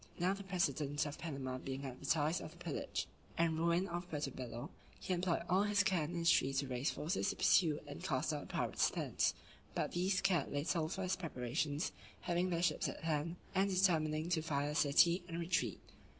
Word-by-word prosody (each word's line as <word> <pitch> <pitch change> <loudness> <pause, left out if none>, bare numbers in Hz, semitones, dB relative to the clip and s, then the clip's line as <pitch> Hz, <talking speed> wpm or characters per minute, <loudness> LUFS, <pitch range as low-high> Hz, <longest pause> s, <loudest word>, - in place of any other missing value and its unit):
Now 180 +2 +2
the 200 - -6
president 150 -6 0
of 145 0 -5
Panama 135 -5 -4
being 135 +1 -5
advertised 145 +5 0
of - - -6
the - - -16
pillage - - -3 0.3
and 165 -1 +2
ruin 170 +3 +2
of 175 +1 -4
Puerto 145 -3 -2
Bello, 120 -2 -6 0.3
he 185 - -2
employed 175 -1 0
all 185 +2 +4
his 205 0 +3
care 185 -5 +2
and 170 +4 -5
industry 165 -5 +3
to 135 +1 0
raise 130 +2 0
forces 180 +6 -1
to 205 - -2
pursue 160 -5 +4
and 145 - -8
cast 135 +2 0
out 145 - -2
the - - -10
pirates - - +1
thence; - - 0 0.4
but - - 0
these 185 +2 +1
cared 175 -7 +1
little 155 +2 0
for 190 +2 -3
his 185 0 +1
preparations, 145 0 -2 0.3
having 175 +1 0
their 170 -1 0
ships - - +1
at - - -7
hand, 160 +1 0 0.2
and 195 +1 +3
determining 160 -5 +2
to 170 -3 +2
fire 145 -2 -1
the - - -2
city, 170 +5 +5
and 170 -1 -4
retreat. 165 - 0
165 Hz, 195 wpm, -37 LUFS, 145-180 Hz, 0.4 s, city